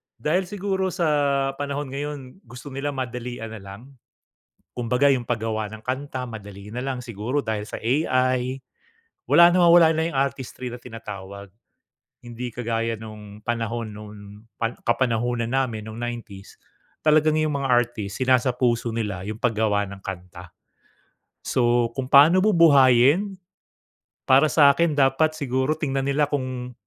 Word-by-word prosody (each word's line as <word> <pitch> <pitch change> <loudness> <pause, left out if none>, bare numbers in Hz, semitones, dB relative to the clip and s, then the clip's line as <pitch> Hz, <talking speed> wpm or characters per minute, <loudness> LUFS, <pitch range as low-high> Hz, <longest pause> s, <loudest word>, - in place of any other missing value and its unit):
dahil 165 +9 -1
siguro 190 -1 -2
sa 145 -6 +1
panahon 145 -1 -4
ngayon 145 +2 -6
gusto 125 +4 -10
nila 140 +1 -4
madalian 120 -3 -5
na 110 - -8
lang. 100 +2 -11 1.0
Kumbaga, 125 +4 +2
'yong 125 -4 0
paggawa 110 -2 -2
ng 110 - -11
kanta, 130 +1 -4
madali 105 -2 -10
na 120 - -6
lang, 130 -2 -3
siguro 120 +4 -3
dahil 110 -2 -3
sa - - -6
AI. 130 0 0 0.7
Wala, 170 0 +7
nawawala 170 -2 +6
na 160 0 0
'yong 140 - -4
artistry 130 -2 -3
na 120 - -9
tinatawag. 100 -4 -9 0.7
Hindi 120 0 -7
kagaya 115 -1 -2
no'ng 105 -1 -11
panahon 115 -1 -3
no'ng 105 0 -10 0.4
'pag 115 +1 -3
kapanahunan 120 -1 0
namin 130 -4 -1
no'ng 110 +1 -8
90s. 115 -5 -7 0.5
Talagang 155 0 +4
'yong 155 0 +1
mga 140 - -2
artist 120 -3 0
sinasapuso 125 -2 +1
nila 100 -4 -3
'yong 110 +1 -6
paggawa 110 -3 +1
ng 100 - -9
kanta. 90 -2 -9 0.9
So, 120 -1 +1
kung 130 - -2
paano 145 +6 +6
bubuhayin, 160 - +5 0.9
para 135 +4 +5
sa'kin, 150 +1 +4
dapat 145 +3 +2
siguro 130 +1 0
tingnan 135 -3 -2
nila 145 +1 +2
kung 130 -3 -4
125 Hz, 135 wpm, -23 LUFS, 115-140 Hz, 1.0 s, Wala